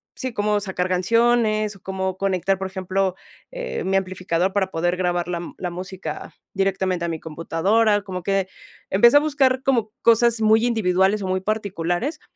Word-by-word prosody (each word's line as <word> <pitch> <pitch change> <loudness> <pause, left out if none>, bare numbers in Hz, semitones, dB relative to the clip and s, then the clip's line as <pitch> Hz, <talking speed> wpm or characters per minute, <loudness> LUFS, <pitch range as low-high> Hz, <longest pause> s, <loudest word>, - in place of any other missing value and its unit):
sí, 260 -1 -4
cómo 205 0 0
sacar 185 -2 -2
canciones, 215 +2 +2
o 195 - -18
cómo 190 -1 -3
conectar, 195 0 0
por 190 0 -4
ejemplo, 190 0 -1 0.4
eh, - - -4
mi 195 +1 +1
amplificador, 185 -1 -1
para 200 -2 +1
poder 175 +2 0
grabar 175 -1 -1
la 175 -1 -2
m 170 - -8
la 180 - -3
música 180 -3 -7 0.2
directamente 190 -2 0
a 170 - -1
mi 160 - -4
computadora, 195 +7 +1
como 185 -3 -6
que 195 -1 0 0.4
empecé 235 +8 +6
a - - +8
buscar 275 -4 +1
como 235 -6 +1
cosas 230 0 +4
muy 220 +1 +4
individuales, 200 -3 +2
o 190 - -3
muy 185 0 -1
particulares, 200 - -2
195 Hz, 170 wpm, -22 LUFS, 180-215 Hz, 0.4 s, a